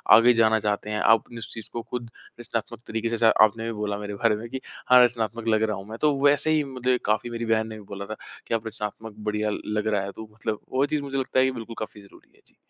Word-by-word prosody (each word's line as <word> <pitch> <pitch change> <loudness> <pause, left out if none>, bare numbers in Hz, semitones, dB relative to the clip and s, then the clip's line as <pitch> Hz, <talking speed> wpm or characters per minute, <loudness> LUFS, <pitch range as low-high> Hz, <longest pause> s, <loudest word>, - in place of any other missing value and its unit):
आगे 120 +2 +7
जाना 110 -1 +4
चाहते 105 0 -1
हैं 105 0 -1
आप 115 +1 +5
उस 115 - -7
चीज़ 115 -2 -8
को 120 - -3
खुद 120 0 -6 0.3
रचनात्मक 115 0 -4
तरीके 115 +1 -2
से 115 - -1
जैसा 115 -1 +5
आपने 115 +1 -3
भी 115 - -2
बोला 105 -1 -1
मेरे 105 0 -5
बारे 110 0 +2
में 110 +3 -6
कि 130 - -5 0.3
हाँ, 125 0 +8
रचनात्मक 115 -1 -1
लग 110 -1 +3
रहा 110 -1 0
हूँ 95 +1 -9
मैं 110 - -6
तो 150 -1 +4
वैसे 145 +2 +4
ही 155 -1 +3
मुझे 130 -2 0
काफ़ी 110 +3 +1
मेरी 115 0 -4
बहन 110 0 +1
ने 110 - -7
भी 105 - -11
बोला 100 0 -5
था 110 +1 -6 0.3
कि - - -2
अब 115 0 -1
रचनात्मक 105 0 -6
बढ़िया 105 0 -1 0.2
लग 105 0 -1
रहा 105 -2 +2
है 100 - -5
तू 110 -1 -9
मतलब 110 -1 -3
वो 135 +2 +2
चीज़ 150 0 -1
मुझे 135 -1 -3
लगता 130 0 +1
है 130 - +5
की 130 - +1
बिल्कुल 115 -2 -7
काफ़ी 105 -1 -6
ज़रूरी 100 - -19
है। - - -26
जी। - - -22
115 Hz, 270 wpm, -25 LUFS, 105-120 Hz, 0.3 s, हाँ